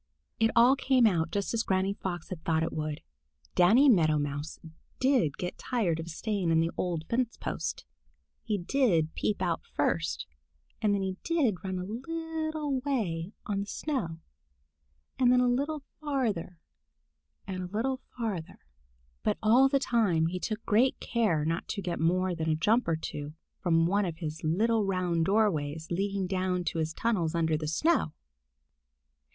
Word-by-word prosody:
It 225 0 +4
all 245 +3 +7
came 260 -2 +3
out 170 -6 +2
just 200 +4 -2
as 230 - +1
Granny 190 -1 +1
Fox 175 -4 -5
had 175 -4 -6
thought 160 -1 +1
it 165 - -2
would. 155 -1 -3 0.5
Danny 225 +11 +6
Meadow 160 - +5
Mouse 145 +1 -3 0.4
did 255 - +2
get 180 - -5
tired 195 -10 0
of 165 +1 -6
staying 195 +1 -2
in 165 0 +4
the 165 +1 +1
old 170 -3 -2
fence 240 0 -1
post. - - -4 0.6
He 215 -3 -1
did 175 - +1
peep 205 -3 -1
out 170 -2 0
first, 65 +1 0 0.6
and 210 - +3
then 200 -1 +1
he 190 -1 -3
did 270 - +1
run 190 -1 -3
a 180 - -3
little 315 - -3
way 205 - -2
on 200 -1 -1
the 200 - -3
snow, 215 - -3 1.0
and 250 -1 +5
then 250 - +5
a 250 - +3
little 280 +4 0 0.2
farther 230 - -1 0.9
and 185 -1 -4
a 180 - -4
little 230 +8 -1 0.2
farther. 205 -9 -3 0.6
But - - 0
all 245 +5 +6
the 275 - +3
time 220 -11 +2
he 180 +2 -2
took 215 +3 -4
great 235 +5 +3
care 195 -11 +1
not 165 +1 -1
to - - -3
get 175 -1 -3
more 180 +3 +2
than 160 -1 -2
a 155 - +3
jump 220 +10 +2
or 165 - +2
two 150 -1 -6 0.2
from 165 -2 +3
one 200 +4 +2
of 165 -3 -4
his 160 -2 -5
little 215 +8 +2
round 180 -4 0
doorways 160 -7 +1
leading 195 +2 -1
down 185 -1 -1
to 165 - -2
his 160 0 -1
tunnels 175 -5 0
under 160 -2 +2
the 155 0 -3
snow. 230 - +1
190 Hz, 170 wpm, -29 LUFS, 165-235 Hz, 1.0 s, all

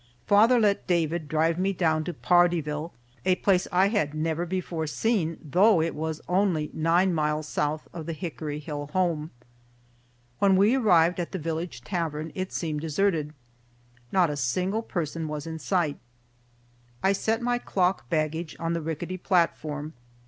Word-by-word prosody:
Father 225 +5 +5
let 205 -3 +1
David 170 -2 0
drive 160 +2 +1
me 195 +1 +1
down 160 -3 +1
to 175 - -2
Pardeeville, 165 -2 +2 0.3
a 185 0 +3
place 185 -1 +2
I 185 +2 +4
had 155 -9 0
never 160 +2 -1
before 170 -3 -3
seen, 170 -2 0
though 180 +6 +4
it 165 +1 0
was 160 +1 -4
only 180 -5 +1
nine 170 +4 +2
miles 150 -1 0
south 150 +1 -2
of 165 -3 -7
the 165 - -2
Hickory 155 -3 -5
Hill 145 -1 -5
home. 170 -4 0 1.1
When 195 -1 +4
we 200 +5 +4
arrived 180 -9 +4
at 175 - -4
the - - -1
village 165 -4 -4
tavern, 160 -3 -3
it 185 0 -4
seemed 155 -3 -3
deserted. 160 -1 0 0.8
Not 180 -5 +3
a 145 - -4
single 180 - 0
person 165 -6 -3
was 150 0 -5
in 160 0 -5
sight. 165 -3 0 1.0
I 190 - +4
set 225 +4 -1
my 245 0 +1
clock 180 - 0
baggage 160 +1 -1
on 165 0 -1
the 170 - -1
rickety 165 +3 -4
platform. 160 -5 0
165 Hz, 155 wpm, -26 LUFS, 155-185 Hz, 1.1 s, Father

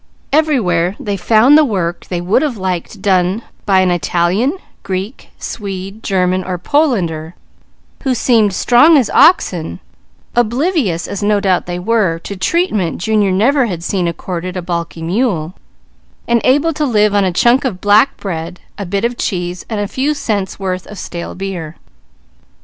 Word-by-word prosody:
Everywhere 205 - +2
they 205 -1 -3
found 220 +8 +4
the 310 - +7
work 180 - -2
they 175 -2 -3
would 185 +8 +2
have 285 -7 -1
liked 190 +1 -4
done 190 +2 +1 0.2
by 190 -2 +4
an 185 -1 +2
Italian, 175 - 0 0.2
Greek, 195 +6 -5
Swede, 195 0 -6
German, 185 -2 0
or 180 0 -3
Polander 175 - 0 0.7
who 265 -3 0
seemed 225 -4 +3
strong 275 - +5
as 255 -6 +1
oxen, 180 - +3 0.6
oblivious, 240 - 0
as 200 - -5
no 205 0 +2
doubt 190 -3 0
they 175 0 -3
were, 190 -3 +1
to 200 +4 -7
treatment 205 - 0
Junior 205 +1 +1
never 245 +7 +2
had 175 -5 -5
seen 180 -1 -1
accorded 180 +2 -4
a - - -2
balky 170 -1 -4
mule, 180 -3 -1 0.7
and 235 -1 +2
able 290 +5 +3
to 300 - -2
live 210 -6 +2
on 205 -1 +3
a 185 - +1
chunk 240 +9 +3
of 225 -9 -3
black 205 +7 +3
bread, 170 -2 -5 0.2
a 200 - -4
bit 200 +4 -1
of 240 0 -3
cheese, 175 -2 -3
and 220 -2 -2
a 205 - -1
few 280 +7 -1
cents' 205 -8 -2
worth 185 -1 -3
of 210 - -10
stale 170 -2 -6
beer. 180 -5 -5
195 Hz, 160 wpm, -15 LUFS, 180-235 Hz, 0.7 s, the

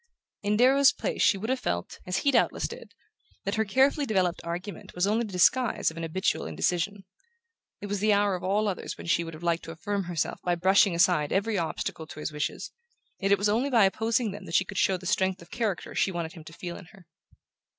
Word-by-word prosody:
In 210 +1 +1
Darrow's 270 +3 +6
place - - -3
she 200 - +4
would 220 +6 -3
have 260 - 0
felt, 85 - -3
as 180 - 0
he 280 - +5
doubtless 240 -3 +2
did, - - -11 0.5
that 200 - -1
her 220 - +1
carefully 270 +7 +2
developed 185 -5 +1
argument 175 +4 -6
was 180 +1 +2
only 220 +3 +1
the - - -10
disguise 235 +4 +3
of - - -13
an - - -4
habitual 165 - -1
indecision. 175 - -1 0.8
It - - -5
was 205 0 -2
the 215 +2 +3
hour 205 -1 +3
of 180 - -4
all 205 +3 +1
others 195 - -4
when - - -9
she 170 0 +2
would 165 -1 -7
have 160 - -12
liked 170 -1 +1
to 165 - -7
affirm 195 +4 -3
herself 175 -2 -2
by 175 -1 0
brushing 190 +1 +4
aside 170 -4 +3
every 205 +1 +1
obstacle 160 -1 -4
to 155 - -10
his 150 - -4
wishes; 150 0 -4 0.5
yet 195 +1 0
it 200 - +6
was 200 +2 +1
only 235 +7 +1
by 230 -6 +5
opposing 225 +3 0
them 200 0 -9
that 165 - -4
she 190 - +4
could - - -4
show 190 - +2
the 180 - -13
strength 190 +1 +1
of 170 0 -15
character 220 -7 -2
she 195 - +1
wanted 170 -2 -4
him 160 -4 -12
to 160 - -11
feel 175 0 -6
in - - -11
her. 190 0 -18
190 Hz, 235 wpm, -27 LUFS, 170-210 Hz, 0.8 s, Darrow's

